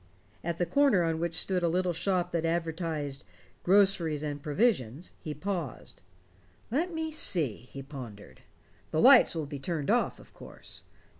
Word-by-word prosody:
At 170 0 -3
a 175 - +2
corner 275 -7 +3
on 165 -1 -1
which 170 0 -2
stood 185 -2 +1
a 170 - +2
little 180 +1 0
shop 180 +1 0
that 170 -1 -1
advertised 165 - -2 0.4
"Groceries 180 -6 +3
and 145 -1 -4
Provisions" 150 - 0
he 155 -3 -6
paused. 170 - -5 0.7
"Let 330 +8 0
me 320 -1 -3
see," 165 - +1 0.2
he 135 - -7
pondered. 115 - -10 0.5
"The - - -1
lights - - +7
will 160 -2 -2
be 145 -1 -7
turned 155 +3 -2
off, 240 - +1
of - - -17
course. - - -11
165 Hz, 155 wpm, -29 LUFS, 145-185 Hz, 0.7 s, lights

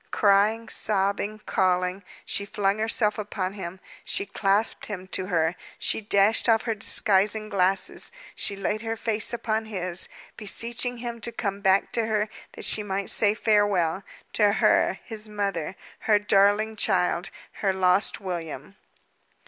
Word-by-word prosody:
Crying, 210 +3 +2
sobbing, 205 +1 -1
calling, 185 +1 0 0.2
she 200 - -2
flung 200 0 -1
herself 220 -1 0
upon 195 -2 -3
him; 190 -2 -7 0.2
she - - -1
clasped 200 +2 0
him 190 -3 -6
to 185 -1 -2
her; 165 -2 +1 0.2
she - - 0
dashed 205 +2 +3
off 225 -1 +4
her 230 - -1
disguising 210 +1 +3
glasses; 190 -1 +2 0.2
she 200 - -1
laid 205 +2 -2
her 225 0 -3
face 220 -1 0
upon 225 -2 -2
his, 185 -4 -2 0.3
beseeching 235 +3 -2
him 235 -1 -6
to 235 - -2
come 200 -3 -4
back 195 0 +2
to 230 -1 -1
her, 215 -1 0 0.2
that - - -4
she 215 - +2
might 195 -1 -1
say 210 -1 +4
farewell 205 -6 +1 0.3
to 205 -2 +3
her, - - +2
his 220 -2 -3
mother; 200 -4 -3 0.2
her 215 -2 +3
darling 205 +2 +2
child, 180 -3 0 0.3
her 195 - +2
lost 190 +1 +2
William! 170 -2 -6
205 Hz, 145 wpm, -25 LUFS, 190-215 Hz, 0.3 s, off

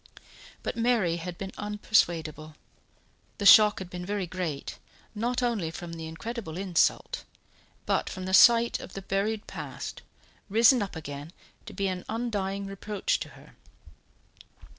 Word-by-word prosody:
But - - -3
Mary 230 -8 +2
had 175 0 -6
been 195 -1 -6
unpersuadable. 170 -7 0 0.8
The 200 - -3
shock 210 0 +9
had 190 - -6
been 180 0 -6
very 200 0 -2
great, 170 -5 -5 0.3
not 240 +3 -1
only 220 -9 0
from 170 +1 -7
the 165 -1 -6
incredible 185 +1 -6
insult, 185 -3 +1 0.6
but - - 0
from 185 -1 -6
the 190 - -3
sight 235 +3 +6
of - - -10
the 195 - -7
buried 205 +3 -1
past, - - -7 0.5
risen 230 +4 +5
up 200 -3 -4
again 145 +1 -7 0.3
to - - -8
be 195 - -1
an 185 -1 -3
undying 200 -4 -2
reproach 210 - -2
to - - -6
her. - - -17
195 Hz, 140 wpm, -28 LUFS, 170-220 Hz, 0.8 s, shock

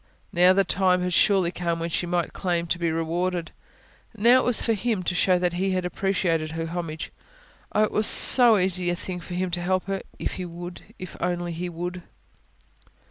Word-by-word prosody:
Now 180 0 +5
the 195 +1 +3
time 180 -1 +1
had 180 0 -2
surely 190 -2 +2
come 170 -2 -3
when 165 0 -4
she 175 - -2
might 175 -1 -2
claim 175 -2 -2
to 175 +1 -3
be 170 -1 -1
rewarded. 170 +2 -3 0.7
Now 240 +4 +5
it - - -1
was 245 -2 +2
for 230 - 0
Him 220 -2 -2
to 180 - -2
show 180 0 +2
that 175 -1 -1
He 190 +2 -1
had 185 -1 -2
appreciated 175 -4 -2
her 165 0 -4
homage. 165 -2 -6 0.6
Oh, 215 - +2
it 215 - -1
was 215 - +3
so 240 -4 +8
easy 180 -1 0
a 175 - -1
thing 180 0 -6
for 175 +1 -8
Him 185 0 -2
to 175 0 -3
help 185 +1 -1
her, 195 -1 -4 0.2
if - - -5
He 185 - -5
would... 175 +1 -9 0.2
if 185 - -9
He - - -15
only 175 0 -3
would! 175 +1 -6
180 Hz, 205 wpm, -24 LUFS, 170-190 Hz, 0.7 s, so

